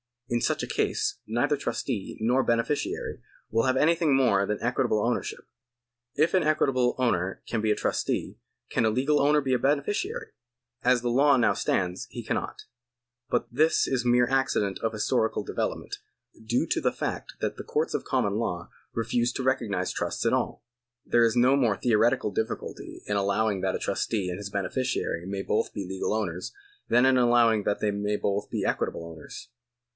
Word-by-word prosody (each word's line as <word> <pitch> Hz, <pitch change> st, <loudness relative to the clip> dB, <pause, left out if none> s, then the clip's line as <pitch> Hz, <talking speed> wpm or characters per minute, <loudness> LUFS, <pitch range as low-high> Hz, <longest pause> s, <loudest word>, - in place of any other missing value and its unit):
In 120 Hz, 0 st, 0 dB
such -, -, 0 dB
a -, -, -3 dB
case -, -, -1 dB
neither 120 Hz, +6 st, +1 dB
trustee 115 Hz, -5 st, -3 dB
nor 125 Hz, +4 st, +3 dB
beneficiary 115 Hz, +4 st, -1 dB, 0.3 s
will 115 Hz, +1 st, +2 dB
have 130 Hz, -1 st, +2 dB
anything 160 Hz, 0 st, +3 dB
more 115 Hz, -7 st, +3 dB
than 105 Hz, -, -1 dB
equitable 120 Hz, -3 st, +1 dB
ownership. 120 Hz, 0 st, -2 dB, 0.7 s
If 155 Hz, +3 st, +2 dB
an 185 Hz, -, +4 dB
equitable 135 Hz, -5 st, +2 dB
owner 95 Hz, -7 st, 0 dB
can 115 Hz, -, -2 dB
be 110 Hz, -, 0 dB
a 105 Hz, -, +3 dB
trustee, -, -, -2 dB, 0.3 s
can 115 Hz, -, +1 dB
a -, -, +4 dB
legal 135 Hz, +6 st, +2 dB
owner 150 Hz, +1 st, +4 dB
be 135 Hz, -2 st, 0 dB
a 125 Hz, -, +2 dB
beneficiary? 205 Hz, -, -1 dB, 0.5 s
As 125 Hz, -1 st, +4 dB
the 120 Hz, -, -1 dB
law 140 Hz, +4 st, +5 dB
now 115 Hz, -3 st, +3 dB
stands, 90 Hz, 0 st, -1 dB
he -, -, -7 dB
cannot. -, -, -3 dB, 0.7 s
But 120 Hz, -1 st, 0 dB
this 155 Hz, +5 st, +3 dB
is 130 Hz, -2 st, 0 dB
a -, -, -2 dB
mere 120 Hz, 0 st, +5 dB
accident 125 Hz, -7 st, 0 dB
of 115 Hz, 0 st, -1 dB
historical 110 Hz, +1 st, 0 dB
development, -, -, -3 dB, 0.5 s
due 120 Hz, +3 st, +1 dB
to -, -, 0 dB
the -, -, +1 dB
fact -, -, -4 dB
that -, -, -2 dB
the -, -, -6 dB
courts -, -, -1 dB
of -, -, -2 dB
common 100 Hz, 0 st, 0 dB
law 90 Hz, -7 st, -3 dB, 0.2 s
refused 120 Hz, +2 st, 0 dB
to 130 Hz, -, -2 dB
recognise 110 Hz, -8 st, 0 dB
trusts -, -, -3 dB
at -, -, +3 dB
all. -, -, -1 dB, 0.4 s
There 120 Hz, 0 st, +4 dB
is 115 Hz, 0 st, +1 dB
no 125 Hz, +3 st, +5 dB
more 120 Hz, -7 st, +2 dB
theoretical 115 Hz, -2 st, +2 dB
difficulty 110 Hz, +3 st, -5 dB
in 105 Hz, -, -1 dB
allowing 100 Hz, 0 st, +1 dB
that 95 Hz, -1 st, 0 dB
a -, -, -3 dB
trustee 100 Hz, -5 st, -1 dB
and 90 Hz, -, -4 dB
his 100 Hz, -1 st, -5 dB
beneficiary 100 Hz, -2 st, -2 dB
may 95 Hz, 0 st, -3 dB
both 105 Hz, -, 0 dB
be 100 Hz, -, -4 dB
legal 95 Hz, +2 st, -2 dB
owners, 90 Hz, -5 st, -3 dB, 0.3 s
than 120 Hz, +2 st, +4 dB
in 130 Hz, -1 st, +5 dB
allowing 120 Hz, -3 st, +4 dB
that 100 Hz, -, -1 dB
they 105 Hz, -, +1 dB
may 105 Hz, +1 st, -1 dB
both 100 Hz, 0 st, -1 dB
be -, -, -2 dB
equitable 85 Hz, -, -1 dB
owners. 80 Hz, +7 st, -10 dB
115 Hz, 180 wpm, -27 LUFS, 105-130 Hz, 0.7 s, law